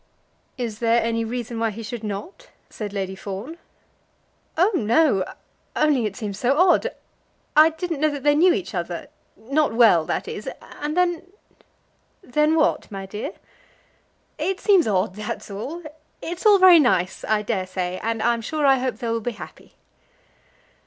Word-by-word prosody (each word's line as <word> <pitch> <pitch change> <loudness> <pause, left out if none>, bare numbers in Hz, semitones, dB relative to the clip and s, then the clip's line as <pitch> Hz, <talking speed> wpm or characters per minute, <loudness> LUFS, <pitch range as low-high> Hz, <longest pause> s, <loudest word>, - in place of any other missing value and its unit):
"Is 230 -4 -4
there 230 0 +3
any 230 0 0
reason 235 0 -4
why 225 0 +1
he 220 +2 -7
should 230 +1 -6
not?" 215 - -7 0.2
said 210 -2 -6
Lady 195 -2 -3
Fawn. 205 - -7 1.0
"Oh, 365 +6 +4
no; 235 - +3 0.5
only 285 -7 +2
it 200 - -7
seems 210 -4 -5
so 265 +3 +2
odd. 360 +1 +4 0.7
I 310 +1 +8
didn't 325 -1 -4
know 310 +1 +3
that 285 -2 -6
they 290 0 +4
knew 345 +5 +5
each 350 +1 -3
other; - - -4 0.3
not 275 +1 0
well, 220 -9 +6
that - - -3
is. - - -5
And 300 +3 -6
then 355 -1 +1 0.5
" - - -42
"Then 300 +1 +4
what, 310 - +1
my 195 -2 -6
dear?" 210 - -6 1.1
"It 385 0 -1
seems 390 - +4
odd; 190 -2 +1
that's 215 +1 -6
all. 275 - -6 0.4
It's 350 +5 -2
all 410 -1 +7
very 370 -3 +8
nice, 190 - +1
I 215 -1 0
dare 200 -4 -2
say, 185 0 -3
and 225 0 -2
I'm 235 0 +1
sure 300 +5 -2
I 270 -1 +5
hope 250 -3 -2
they 235 - -5
will 230 0 -1
be 240 +2 -3
happy." - - -12
240 Hz, 165 wpm, -23 LUFS, 210-310 Hz, 1.1 s, I